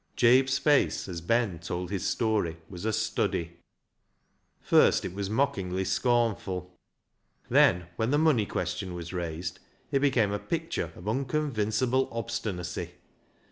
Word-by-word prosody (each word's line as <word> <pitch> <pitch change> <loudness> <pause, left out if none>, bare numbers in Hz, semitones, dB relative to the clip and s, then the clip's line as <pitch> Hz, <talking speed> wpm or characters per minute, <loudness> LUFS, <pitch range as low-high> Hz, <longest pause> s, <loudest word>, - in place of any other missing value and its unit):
Jabe's 130 +2 +4
face 145 -7 +2
as 85 -3 -5
Ben 105 -1 +1
told 90 +2 -4
his 100 -3 -1
story 105 -8 0
was 90 +1 -8
a 110 - +1
study. 85 -5 -1 1.0
First - - +4
it - - -4
was 100 0 -3
mockingly 95 -7 0
scornful. 100 -7 0 0.8
Then, 90 0 +5
when 115 +1 0
the 145 - +3
money 150 -10 +3
question 90 +1 -3
was 85 +1 -7
raised, 85 -1 -4 0.3
it 135 - +3
became 130 -7 +2
a 105 - -1
picture - - -3
of 85 - -12
unconvincible 130 -1 0
obstinacy. 110 -6 -4
105 Hz, 130 wpm, -28 LUFS, 90-125 Hz, 1.0 s, Then